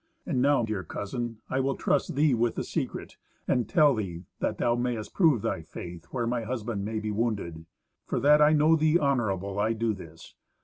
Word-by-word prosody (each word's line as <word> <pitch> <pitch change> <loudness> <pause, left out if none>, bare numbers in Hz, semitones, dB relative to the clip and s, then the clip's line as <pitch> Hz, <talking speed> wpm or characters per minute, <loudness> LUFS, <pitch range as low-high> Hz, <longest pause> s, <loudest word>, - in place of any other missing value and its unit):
And 125 - 0
now, 140 -2 +3
dear 110 -4 -2
cousin, 115 +5 -5
I 130 - -1
will 135 +1 0
trust 140 - 0
thee 145 0 +3
with 120 0 +1
the - - -2
secret, - - -4 0.3
and 125 -2 +1
tell 150 -4 +5
thee, 90 -6 -4 0.2
that - - -1
thou 120 - +2
mayst 120 -2 -2
prove 155 - +3
thy 80 - -1
faith, 85 +1 -9
where 120 -3 -3
my 120 0 -1
husband 110 -3 -3
may 110 +2 -3
be 110 0 -3
wounded. 100 -8 -2 0.4
For - - -1
that 150 +1 +5
I 150 0 +6
know 155 +1 +5
thee 155 +1 +3
honourable, 105 - 0
I 110 +2 +2
do 115 0 0
this. 80 -4 -12
115 Hz, 195 wpm, -28 LUFS, 100-135 Hz, 0.4 s, I